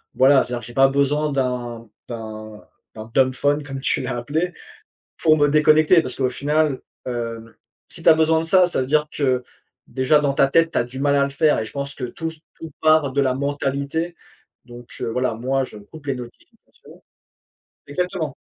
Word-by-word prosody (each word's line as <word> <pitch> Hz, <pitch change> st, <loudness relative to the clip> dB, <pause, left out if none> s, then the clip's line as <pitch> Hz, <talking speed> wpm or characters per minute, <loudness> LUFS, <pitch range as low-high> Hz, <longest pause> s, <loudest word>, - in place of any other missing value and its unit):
voilà, 135 Hz, +1 st, +5 dB
c'est-à-dire 120 Hz, -1 st, -5 dB
que -, -, -10 dB
j'ai 120 Hz, -, -10 dB
pas 135 Hz, +2 st, +5 dB
besoin 140 Hz, +2 st, +1 dB
d'un 120 Hz, -4 st, -3 dB, 0.2 s
d'un 110 Hz, -2 st, -8 dB, 0.3 s
d'un 110 Hz, +1 st, -9 dB
dumbphone 140 Hz, +3 st, +2 dB
comme 135 Hz, -2 st, -6 dB
tu -, -, 0 dB
l'as 125 Hz, -1 st, -3 dB
appelé 155 Hz, +9 st, -2 dB, 0.7 s
pour 155 Hz, -1 st, +4 dB
me 145 Hz, -1 st, +3 dB
déconnecter 155 Hz, +3 st, +5 dB
parce 130 Hz, -5 st, -5 dB
qu'au 130 Hz, -2 st, 0 dB
final, 145 Hz, +1 st, 0 dB, 0.3 s
hem, 115 Hz, -2 st, -5 dB, 0.4 s
si 170 Hz, -, -10 dB
tu -, -, +3 dB
as 165 Hz, -, +9 dB
besoin 160 Hz, 0 st, +3 dB
de -, -, -3 dB
ça, 185 Hz, +2 st, +5 dB
ça 175 Hz, -, -2 dB
veut 130 Hz, -, -1 dB
dire 150 Hz, +2 st, +2 dB
que 130 Hz, -3 st, 0 dB, 0.4 s
déjà 130 Hz, +3 st, +2 dB
dans 145 Hz, -2 st, +1 dB
ta 140 Hz, -, +3 dB
tête, 165 Hz, +3 st, +3 dB
tu -, -, +1 dB
as 120 Hz, -, +1 dB
du 125 Hz, +2 st, -9 dB
mal 140 Hz, +1 st, +2 dB
à 140 Hz, -, +3 dB
le 140 Hz, -, -3 dB
faire 150 Hz, +2 st, +2 dB
et 110 Hz, -, -2 dB
je -, -, -10 dB
pense 140 Hz, 0 st, -5 dB
que 130 Hz, -, -6 dB
tout 160 Hz, +6 st, -5 dB
s 160 Hz, 0 st, -10 dB, 0.2 s
tout 160 Hz, -1 st, -8 dB
part 155 Hz, -3 st, +3 dB
de 140 Hz, -, +1 dB
la 130 Hz, -2 st, +1 dB
mentalité 140 Hz, +4 st, -2 dB, 0.5 s
donc 120 Hz, 0 st, -13 dB
heu, -, -, -2 dB
voilà, 125 Hz, 0 st, -1 dB
moi 130 Hz, +4 st, -1 dB
je 110 Hz, -, -10 dB
coupe 145 Hz, +8 st, -14 dB
les 135 Hz, -, 0 dB
notifications. 120 Hz, -2 st, -14 dB, 0.9 s
exactement. 165 Hz, -2 st, -3 dB
140 Hz, 200 wpm, -21 LUFS, 125-155 Hz, 0.9 s, as